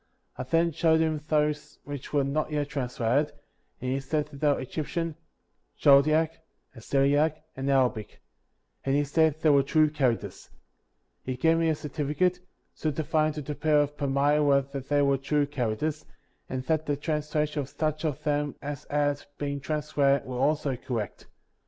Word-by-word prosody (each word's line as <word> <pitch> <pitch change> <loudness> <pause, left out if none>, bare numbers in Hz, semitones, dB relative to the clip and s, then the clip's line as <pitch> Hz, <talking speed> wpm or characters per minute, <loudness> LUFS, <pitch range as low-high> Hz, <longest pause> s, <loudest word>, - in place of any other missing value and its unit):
I - - -5
then. 165 +6 +2
showed 160 0 +3
him 160 -2 0
those 150 -1 0
which 145 -2 -7
were 145 -2 +2
not 145 +3 -1
yet 145 -1 -1
translated, 130 +2 0 0.5
and 130 - -3
he 135 - 0
said 145 +2 -1
that 140 - -11
they 150 - +3
were 145 - +3
Egyptian, 160 +4 -3 0.6
Chaldaic, 155 +3 +4 0.4
Assyriac, 145 +6 +1
and 135 +1 -3
Arabic; 125 -6 +1 0.6
and 135 0 +1
he 145 - +3
said 155 +1 +2
they 155 - +6
were 140 -1 +6
true 155 +2 +3
characters. 130 -6 -1 0.7
He 130 - -4
gave 165 +5 +3
me 165 -1 +2
a 160 - +2
certificate, 150 +5 -1 0.3
certifying 155 0 0
to 150 -1 -5
the 150 - -4
people 150 0 +3
ot^ 145 +1 -14
Palmyra 140 0 +3
that 135 -2 -6
they 145 -1 +3
were 140 -1 +2
true 145 +2 +1
characters, 145 +3 -2 0.5
and 130 0 -3
that 155 +2 0
the 145 -1 0
translation 150 0 -1
of 135 - -7
such 155 0 -2
of 150 -4 -2
them 145 -1 0
as 145 -1 -6
had 145 -1 0
been 140 -1 -3
trans 150 +2 -3
lated 140 -1 +3
were 125 -1 -5
also 145 -1 +1
correct. 115 -4 -5
145 Hz, 165 wpm, -27 LUFS, 140-155 Hz, 0.7 s, they